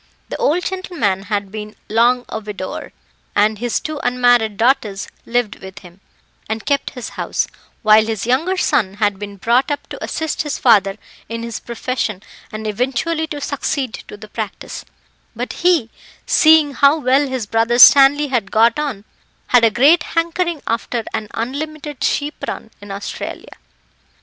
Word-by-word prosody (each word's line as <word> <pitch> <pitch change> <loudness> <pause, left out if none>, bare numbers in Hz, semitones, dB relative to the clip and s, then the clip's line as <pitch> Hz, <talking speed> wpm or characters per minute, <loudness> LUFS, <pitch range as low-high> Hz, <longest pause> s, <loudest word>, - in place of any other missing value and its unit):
The - - -4
old 330 +4 +1
gentleman 340 - -1
had 200 -1 -2
been 210 0 -7
long 240 +3 +2
a 220 - -4
widower, 205 -3 -6 0.4
and 210 +1 +2
his 240 0 -1
two 310 -1 -5
unmarried 245 -4 +3
daughters 225 -5 +1 0.2
lived 235 -3 -1
with 190 0 -10
him, 175 +2 -15 0.5
and 220 -1 -3
kept 280 -1 -1
his 250 - -6
house, - - -2 0.4
while 215 0 +6
his 220 -2 -3
younger 315 +10 +1
son 195 - +1
had 205 -2 0
been 205 -1 -7
brought 240 +8 +2
up 290 - -3
to - - -7
assist 320 -2 -2
his 295 -2 -3
father 200 -5 +4 0.3
in 230 0 -4
his 235 -1 -5
profession, 235 -4 -3 0.3
and 215 0 -6
eventually 265 +9 -1
to 295 -2 -5
succeed 280 -3 -2
to 210 - -10
the 215 +1 -11
practice, 215 -1 -6 0.5
but - - -4
he, 340 -10 +3 0.3
seeing 310 -2 +5
how 280 +3 +4
well 275 0 +2
his 260 -4 -3
brother 225 +3 +1
Stanley 280 +3 +8
had 235 -7 -1
got 230 +7 +3
on, 260 -9 -3 0.4
had 245 -2 +5
a 230 - +6
great 280 +9 +5
hankering 335 0 -1
after 230 +1 -2
an 215 - -3
unlimited 295 +4 -4
sheep 295 +1 -1
run 225 - -6
in 205 - -11
Australia. 200 +1 -6
240 Hz, 160 wpm, -18 LUFS, 215-285 Hz, 0.5 s, Stanley